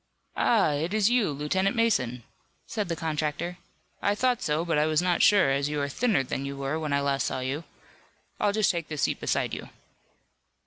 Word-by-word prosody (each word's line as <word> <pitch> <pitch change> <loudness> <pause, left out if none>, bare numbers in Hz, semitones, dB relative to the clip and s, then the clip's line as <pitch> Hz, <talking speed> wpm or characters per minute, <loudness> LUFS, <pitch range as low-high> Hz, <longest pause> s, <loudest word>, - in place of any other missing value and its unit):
"Ah, 210 -9 +3
it 160 +7 -1
is 215 +1 +3
you, 245 -6 +3
Lieutenant 185 - 0
Mason!" 130 - +1 0.4
said 210 -5 -3
the 170 - -1
contractor. 160 +2 -3 0.4
"I 205 - +1
thought 250 +1 +1
so, 155 +1 0
but 165 -3 +1
I 150 - +2
was 155 -1 +2
not 180 -1 +1
sure, 200 -9 +5
as 140 +1 0
you 150 0 -2
are 140 - 0
thinner 215 - +1
than 135 +1 -4
you 140 0 -5
were 140 +3 -2
when 155 -2 -3
I 140 0 +2
last 140 -2 0
saw - - -2
you. 140 +5 -3 0.7
I'll 205 - +2
just 210 -2 +2
take 170 -3 -4
this 155 -2 -3
seat - - 0
beside - - -1
you." - - -6
155 Hz, 205 wpm, -27 LUFS, 140-200 Hz, 0.7 s, sure